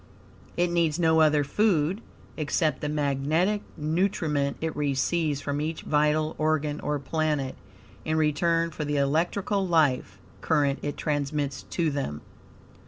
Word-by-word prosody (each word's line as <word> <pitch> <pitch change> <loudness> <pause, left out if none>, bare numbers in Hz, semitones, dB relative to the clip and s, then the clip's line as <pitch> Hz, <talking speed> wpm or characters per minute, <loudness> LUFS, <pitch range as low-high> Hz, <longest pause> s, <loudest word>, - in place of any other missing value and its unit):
It 175 0 +2
needs 165 -3 +1
no 160 -2 +3
other 150 -2 +4
food, 180 +3 +1 0.3
except 155 +1 0
the 150 - -2
magnetic 150 +7 +1 0.2
nutriment 155 -3 0
it 160 0 -3
receives 145 +1 0
from 145 0 -2
each 155 +1 -3
vital 150 +1 +1
organ, 155 -1 0
or 150 - -1
planet, 150 -1 -1 0.5
in 155 +4 -1
return 165 +2 +1
for 155 - -4
the 145 0 -1
electrical 175 +7 0
life 140 - +2 0.2
current 140 -1 +1
it 145 -1 -4
transmits 145 -2 -2 0.2
to 165 -3 +2
them. 105 - -3
150 Hz, 130 wpm, -26 LUFS, 145-165 Hz, 0.5 s, other